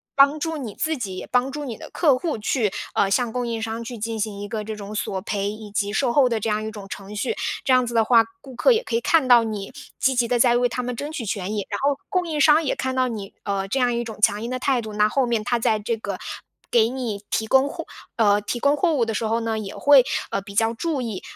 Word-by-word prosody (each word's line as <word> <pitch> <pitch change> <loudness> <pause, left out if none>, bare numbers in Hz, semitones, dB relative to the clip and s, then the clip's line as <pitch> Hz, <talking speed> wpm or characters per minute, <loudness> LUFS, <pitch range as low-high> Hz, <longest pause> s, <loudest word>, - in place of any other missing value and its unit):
帮 280 +2 +5
助 325 +1 -2
你 240 -8 -6
自 320 0 0
己， 195 -7 -5
也 - - -6
帮 250 +2 +1
助 295 +1 -5
你 235 -5 -5
的 - - -10
客 295 -6 +3
户 310 -3 -2
去 215 -1 0 0.2
呃， 195 - +3
向 235 +3 +1
供 245 -1 -2
应 230 -1 -2
商 225 +1 -4
去 235 +1 -7
进 225 +1 -3
行 210 -2 -3
一 205 - -5
个 215 +1 -4
这 215 +1 -5
种 210 0 -8
索 195 -2 -2
赔， 200 0 -2
以 215 -1 -9
及 205 -1 -1
售 245 +1 +1
后 270 -1 +5
的 230 -2 0
这 215 - -3
样 215 0 0
一 - - -3
种 205 -2 -9
程 200 +1 -8
序。 325 - -1 0.3
这 260 - +3
样 255 -1 +4
子 240 - -4
的 225 - +5
话， 230 0 +5 0.2
顾 265 0 -12
客 - - +4
也 465 0 +2
可 230 - -3
以 230 - +1
看 315 +1 +3
到 240 -2 +7
你 210 -3 -5 0.3
积 265 - +3
极 245 -1 +2
地 245 0 +1
在 240 0 +5
为 245 0 +3
他 250 +2 -3
们 245 0 -3
争 290 +5 -5
取 295 -7 -5
权 200 -1 -3
益。 205 - -2
然 200 - -2
后 280 0 +1
供 365 -3 0
应 310 -2 -2
商 300 +3 +6
也 285 - 0
看 260 0 -2
到 255 0 +2
你， 210 -4 -6
呃， 195 -1 -2
这 265 +7 -1
样 245 -1 +2
一 235 - -1
种 225 -2 -8
强 205 0 +3
硬 235 - -4
的 255 - -1
态 260 -1 +1
度， 215 -1 -7
那 210 0 +3
后 270 +3 +1
面 230 -3 0
他 240 +3 +1
在 220 -1 +2
这 225 +2 -2
个 220 - -5 0.5
给 230 -1 +4
你 235 -5 -4
提 220 - 0
供 265 +4 +4
货 - - -6 0.3
呃， 205 -3 +4
提 225 +4 -3
供 285 +4 +3
货 335 0 +2
物 245 -5 +2
的 225 - -2
时 230 - -1
候 225 +1 +1
呢， 225 -1 -2
也 200 -2 -6
会， 280 -3 +6 0.3
呃， - - 0
比 200 0 -11
较 225 +2 +2
注 295 +3 -2
意， 220 -6 -4
230 Hz, 305 characters per minute, -23 LUFS, 210-260 Hz, 0.5 s, 到